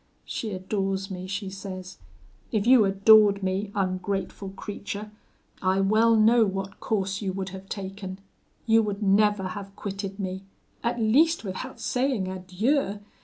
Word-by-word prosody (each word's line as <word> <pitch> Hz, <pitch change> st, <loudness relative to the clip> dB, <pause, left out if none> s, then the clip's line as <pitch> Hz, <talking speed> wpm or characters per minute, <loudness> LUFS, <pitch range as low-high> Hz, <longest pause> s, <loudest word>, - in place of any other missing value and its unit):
She 225 Hz, -, -4 dB
adores 195 Hz, 0 st, -2 dB
me, 185 Hz, 0 st, -5 dB
she 195 Hz, 0 st, -4 dB
says. 185 Hz, -, -8 dB, 0.5 s
If 215 Hz, -2 st, 0 dB
you 245 Hz, -3 st, +7 dB
adored 200 Hz, 0 st, +6 dB
me, 190 Hz, +2 st, -1 dB
ungrateful 195 Hz, 0 st, -2 dB
creature, 205 Hz, +1 st, -6 dB, 0.5 s
I 190 Hz, 0 st, +2 dB
well 220 Hz, +4 st, +4 dB
know 225 Hz, +2 st, +5 dB
what 195 Hz, -1 st, -3 dB
course 195 Hz, -2 st, -1 dB
you 195 Hz, -2 st, -1 dB
would 190 Hz, 0 st, -4 dB
have 190 Hz, +1 st, -10 dB
taken; 195 Hz, -1 st, -6 dB, 0.5 s
you 225 Hz, 0 st, +5 dB
would 210 Hz, -1 st, -3 dB
never 205 Hz, -1 st, +3 dB
have 200 Hz, 0 st, -8 dB
quitted 195 Hz, -1 st, -5 dB
me, 190 Hz, -1 st, -3 dB, 0.4 s
at 235 Hz, +1 st, 0 dB
least 290 Hz, +10 st, +3 dB
without 205 Hz, +7 st, -6 dB
saying 250 Hz, -6 st, 0 dB
adieu. 195 Hz, +6 st, 0 dB
195 Hz, 140 wpm, -26 LUFS, 190-215 Hz, 0.5 s, you